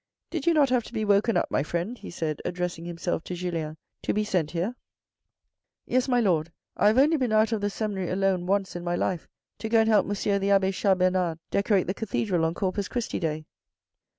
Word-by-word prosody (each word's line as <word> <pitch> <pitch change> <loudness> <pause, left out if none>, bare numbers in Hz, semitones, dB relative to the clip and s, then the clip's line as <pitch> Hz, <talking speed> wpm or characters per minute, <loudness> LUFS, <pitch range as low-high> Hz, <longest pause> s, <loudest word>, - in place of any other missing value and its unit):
Did 325 -2 -3
you 335 - +5
not 285 -4 +4
have 250 -1 +3
to - - -12
be 220 -2 -1
woken 205 +2 +3
up, - - 0
my - - +2
friend," 170 - -2
he - - -10
said, 155 -3 -3
addressing 180 -1 -3
himself 175 0 -3
to 180 - -4
Julien. 165 -3 -3
" - - -58
To - - -1
be 215 - +2
sent 180 -7 0
here? 180 +9 -2 0.4
" - - -58
" - - -62
Yes, 255 +1 +1
my 245 -2 +3
Lord. 170 -7 +1 0.2
I - - +3
have 215 +3 +4
only 300 +4 +5
been 255 -5 0
out 215 +1 +3
of 220 -2 0
the 205 - 0
seminary 200 -4 -3
alone 185 -1 0
once 195 -1 0
in 175 - -5
my 175 0 -1
life 175 -1 -1 0.3
to 220 - -4
go 225 0 +5
and 220 - +1
help 215 -3 +4
M. 200 0 0
the 195 +1 0
abbe 195 -1 +4
Chas 190 0 +2
Bernard 180 -2 +1
decorate 200 -2 +2
the 185 - -1
cathedral 195 -5 -1
on 165 +1 -1
Corpus 195 +1 -1
Christi 240 -2 -3
day. 155 -2 -2
195 Hz, 235 wpm, -26 LUFS, 175-220 Hz, 0.4 s, you